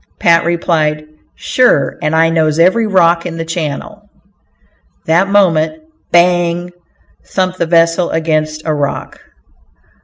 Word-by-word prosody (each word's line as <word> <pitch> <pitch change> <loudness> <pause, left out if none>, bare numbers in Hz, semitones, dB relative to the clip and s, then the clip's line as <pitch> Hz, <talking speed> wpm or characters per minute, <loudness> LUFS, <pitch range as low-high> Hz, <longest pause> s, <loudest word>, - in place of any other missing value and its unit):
Pat 170 -1 +3
replied, 155 -3 -1 0.3
"Sure 150 - +1
and 150 +1 -1
I 165 0 +3
knows 155 -2 +1
every 190 +7 +3
rock 175 -3 +2
in 165 -1 -7
the 165 - -4
channel." 170 +6 -6 1.0
That 170 +5 +2
moment, 190 - +1 0.3
"bang" 175 0 +1 0.5
thumped 185 -1 -3
the 170 - 0
vessel 170 +1 +2
against 155 -1 -2
a 155 - 0
rock. 145 -1 -4
170 Hz, 120 wpm, -14 LUFS, 160-180 Hz, 1.0 s, Pat